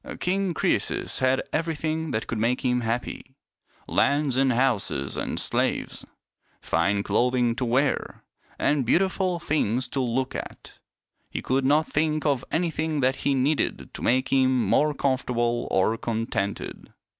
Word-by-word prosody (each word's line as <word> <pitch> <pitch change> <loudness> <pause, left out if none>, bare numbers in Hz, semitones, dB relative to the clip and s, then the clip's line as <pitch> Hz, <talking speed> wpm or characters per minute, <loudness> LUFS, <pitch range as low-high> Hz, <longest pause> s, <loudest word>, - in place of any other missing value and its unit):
King 185 -1 0
Croesus - - 0
had 130 +1 +2
everything 160 0 -1
that 110 -5 -2
could 115 - -3
make 120 +3 +1
him 125 -1 +2
happy 120 +3 -4 0.2
— - - -50 0.2
lands 140 -2 +2
and 135 0 +3
houses 115 - 0
and - - -2
slaves, - - -1 0.5
fine 100 +5 +1
clothing 120 +3 +1
to 130 - -1
wear, 130 +4 0 0.3
and 145 -2 +1
beautiful 185 - +1
things 130 -7 0
to 140 - -2
look 125 +1 -1
at. - - -8 0.5
He - - -5
could 130 +1 +1
not 150 +3 +4
think 155 0 0
of 140 -4 +1
anything 160 -3 0
that 130 +1 +2
he 140 - 0
needed 140 +4 0
to - - -7
make 130 +2 +2
him 130 -2 +3
more 150 0 +2
comfortable 120 -3 0
or 95 +4 +2
contented. 110 -3 -3
130 Hz, 145 wpm, -25 LUFS, 120-150 Hz, 0.5 s, not